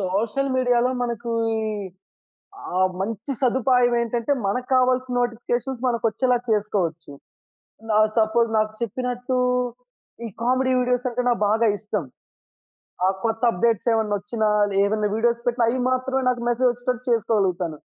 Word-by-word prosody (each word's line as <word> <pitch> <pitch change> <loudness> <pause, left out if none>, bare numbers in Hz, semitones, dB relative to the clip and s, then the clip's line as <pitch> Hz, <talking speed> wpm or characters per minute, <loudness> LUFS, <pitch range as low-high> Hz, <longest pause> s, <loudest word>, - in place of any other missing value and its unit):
Social 215 +8 -1
మీడియాలో, 245 -1 +2
మనకీ 235 -1 -3 1.5
ఆహ్, 185 0 +3
మంచి 225 +6 -4
సదుపాయం 250 -1 +3
ఏంటంటే, 235 +3 -2
మనకు 250 +6 -1
కావాల్సి 255 0 +2
నోటిఫికేషన్స్ 240 +1 -2
మనకొచ్చేలా 245 +1 +1
చేసుకోవచ్చు. 185 -7 -1 0.9
ఆహ్, 215 0 +5
సపోజ్ 225 +1 +2
నాకు 215 0 0
చెప్పినట్టు, 250 +2 -2 0.9
ఈ - - -4
కామెడీ 260 +2 +2
వీడియోస్ 250 0 0
అంటే 250 +1 -2
నాకు 240 - +1
బాగా 225 +2 +3
ఇష్టం. 210 -5 -3 1.0
ఆ - - +4 0.2
కొత్త 225 +1 -1
అప్డేట్స్ 230 +3 0
ఏమైనా 220 -2 0
వోచ్చిన, 210 +3 -3 0.4
ఏమైనా 210 +1 0
వీడియోస్ 235 +1 +1
పెట్టిన, 240 0 +1
అయి 250 +3 0
మాత్రమే 260 +1 0
నాకు 250 -1 0
మెసేజ్ 245 +1 +2
వచ్చేటట్టు 245 0 -3
చేసుకోగలుగుతాను. 190 -8 0
235 Hz, 125 wpm, -23 LUFS, 215-250 Hz, 1.5 s, ఆహ్